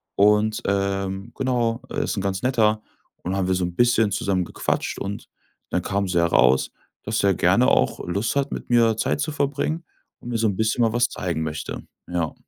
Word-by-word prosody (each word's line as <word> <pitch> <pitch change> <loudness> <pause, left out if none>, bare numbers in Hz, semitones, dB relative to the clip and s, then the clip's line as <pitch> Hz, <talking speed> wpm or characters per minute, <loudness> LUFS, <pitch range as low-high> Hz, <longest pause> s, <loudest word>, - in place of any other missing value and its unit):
und, 105 +2 +3
ähm, 100 +1 -1
genau, 120 -3 0
er - - -3
ist 110 - -2
'n - - 0
ganz 95 -1 -2
Netter.“, 110 -4 +2 0.4
und 95 +2 -2
haben 95 -2 0
wir 95 - +2
so 90 - -1
'n 85 - -6
bisschen 120 -2 +3
zusammen 95 -1 0
gequatscht - - -2
und 100 +1 -6 0.4
dann - - 0
kam 100 0 -1
so 85 - +2
heraus, 65 -6 +3 0.3
dass 105 -1 -1
er 100 - +4
gerne - - +3
auch - - +1
Lust 100 +9 -1
hat, 140 0 0
mit - - -6
mir 115 -2 +4
Zeit 140 - 0
zu 155 - -1
verbringen 145 +3 -1 0.3
und 120 - -9
mir 115 - -1
so 110 - +2
'n 100 -3 -2
bisschen 110 +2 +1
mal 115 - +3
was 120 0 +3
zeigen 85 -7 -3
möchte, 75 -1 -5 0.3
ja. 85 -3 -1
105 Hz, 200 wpm, -23 LUFS, 95-120 Hz, 0.4 s, er